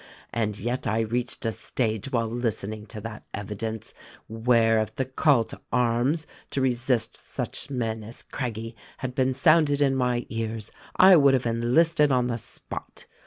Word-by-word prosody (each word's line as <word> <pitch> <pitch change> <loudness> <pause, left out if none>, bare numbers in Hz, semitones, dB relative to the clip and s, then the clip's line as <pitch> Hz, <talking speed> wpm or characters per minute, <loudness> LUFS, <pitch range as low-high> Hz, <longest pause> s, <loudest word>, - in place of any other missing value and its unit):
and 105 -3 -1
yet 120 +5 -2
I 110 +2 +1
reached 120 +2 -2
a 115 - +1
stage 110 +1 -2
while 115 -3 +1
listening 110 -2 -3
to 110 - -7
that 110 0 -7
evidence, 105 +2 -4 0.3
where, 115 0 +3
if 110 0 -3
the 130 - -1
call 130 -1 +3
to - - -11
arms 125 +6 +2 0.2
to - - -2
resist 125 -2 +1
such - - -4
men 115 -4 -2
as 115 +3 -8
Craggie 115 -3 -5 0.2
had 130 -1 -4
been 130 0 +1
sounded 155 -2 +4
in 140 -2 +3
my 125 -2 0
ears, 115 -2 -4 0.2
I 185 -1 +8
would 140 -3 +6
have 130 - -1
enlisted 145 +7 +3
on 125 -1 +3
the 120 -1 -1
spot. - - -7
120 Hz, 165 wpm, -26 LUFS, 110-130 Hz, 0.3 s, I